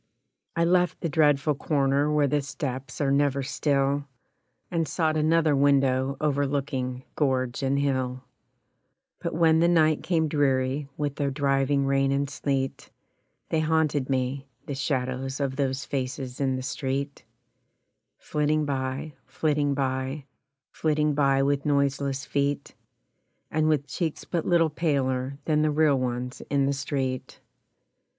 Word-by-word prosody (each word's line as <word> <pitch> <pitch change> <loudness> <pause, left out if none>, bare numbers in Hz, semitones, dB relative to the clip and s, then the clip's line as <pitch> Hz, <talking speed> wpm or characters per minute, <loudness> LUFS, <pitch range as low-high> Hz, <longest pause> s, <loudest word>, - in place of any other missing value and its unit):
I 170 - +2
left 180 0 +2
the 165 - -1
dreadful 145 -1 +3
corner 140 0 +1
where 150 -1 +3
the 145 +1 +1
steps 135 -1 -5
are 140 -1 +2
never 140 -1 +2
still, 140 0 0 0.7
And 165 -2 0
sought 160 -1 0
another 155 0 +3
window 135 -1 +2
overlooking 140 -3 -1
gorge 130 -3 0
and 135 0 +1
hill; 130 -2 -1 1.0
But - - -3
when 160 -1 +4
the 170 - +4
night 155 -3 +3
came 160 -3 +1
dreary 140 -1 0
with 145 -2 -2
the 145 -2 0
driving 140 0 +1
rain 135 0 +2
and 140 +1 +1
sleet, 135 -1 -2 0.6
They 160 - +1
haunted 155 -4 +1
me 135 +1 -1 0.2
the 145 - -4
shadows 135 -1 -2
of 135 -2 -1
those 135 -1 -1
faces 130 -1 -4
in 135 -1 +1
the 130 - -4
street, 140 +1 -3 0.9
Flitting 150 0 0
by, 135 +2 -3
flitting 145 -2 0
by, 135 +1 -2 0.5
Flitting 150 -1 +1
by 135 -1 +3
with 140 0 +1
noiseless 140 -2 0
feet, 140 0 -1 0.8
And 155 0 +2
with 150 -3 +1
cheeks 160 0 -3
but 170 -3 -2
little 165 -3 +3
paler 135 -4 -1
than 150 -1 +2
the 155 - +2
real 150 -2 +3
ones 125 0 -3
in 140 -1 +2
the 140 - +1
street. 135 -2 -3
140 Hz, 135 wpm, -26 LUFS, 135-150 Hz, 1.0 s, when